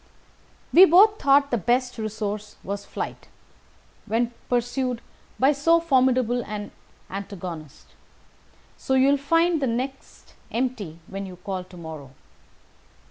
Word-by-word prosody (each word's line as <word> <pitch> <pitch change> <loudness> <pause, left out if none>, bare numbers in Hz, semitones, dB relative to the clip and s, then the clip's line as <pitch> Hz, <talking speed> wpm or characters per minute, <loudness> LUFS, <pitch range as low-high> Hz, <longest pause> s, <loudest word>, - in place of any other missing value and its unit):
"We 365 +3 +10
both 410 +5 +6
thought 280 0 +4
the 240 - +1
best 245 +4 0
resource 210 -1 -4
was 200 +1 -5
flight, - - -6 0.8
when 230 +2 0 0.2
pursued 245 0 0 0.4
by 270 +2 +5
so 330 +4 +3
formidable 255 -6 +2
an 210 -1 -5 0.4
antagonist; 180 -6 -7 0.9
so 265 - -1
you 265 +1 +5
will 285 - +4
find 330 +3 +2
the 270 - +1
nest 255 +3 -5 0.2
empty 230 -9 -2
when 195 +1 -6
you 185 - -9
call 185 0 -5
to 185 0 -14
morrow. 160 -5 -8
245 Hz, 125 wpm, -24 LUFS, 200-275 Hz, 0.9 s, We